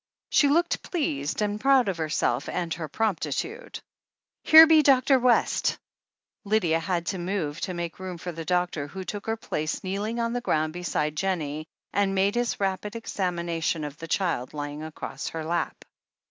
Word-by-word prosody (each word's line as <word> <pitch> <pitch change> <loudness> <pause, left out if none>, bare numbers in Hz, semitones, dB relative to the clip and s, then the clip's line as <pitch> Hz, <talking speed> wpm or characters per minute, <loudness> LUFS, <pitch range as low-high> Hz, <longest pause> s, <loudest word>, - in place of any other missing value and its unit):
She 290 - +5
looked 340 +5 +2
pleased, 165 - -2
and 210 0 -2
proud 270 -3 +4
of 190 -3 -1
herself 150 -5 0
and 170 -2 -2
her 160 -2 -5
promptitude. 220 - -2 0.6
"Here 320 +1 +10
be 320 -1 +6
Dr. 270 -1 +4
West 245 -1 +2 0.3
!" - - -66
Lydia 200 -6 +2
had 170 +1 -2
to 185 - -5
move, 175 -4 -3
to 185 - -3
make 170 0 -5
room 185 -2 -6
for 175 +1 -5
the 165 0 -6
doctor, 175 -3 -1
who 190 +5 -7
took 205 +3 -6
her 225 0 0
place 155 -7 -3
kneeling 205 +5 -2
on 230 0 0
the 245 - -2
ground 155 -9 0
beside 155 -4 -2
Jen 190 +3 0
nie, 155 0 -5 0.3
and 200 -1 +1
made 195 +1 +2
his 240 0 -1
rapid 195 +2 -2
examination 170 -7 -2
of 150 0 -7
the 165 - -7
child 160 -7 -1
lying 145 0 -5
across 155 0 -6
her 160 -1 -4
lap. 170 +2 -2
180 Hz, 175 wpm, -26 LUFS, 160-220 Hz, 0.6 s, Here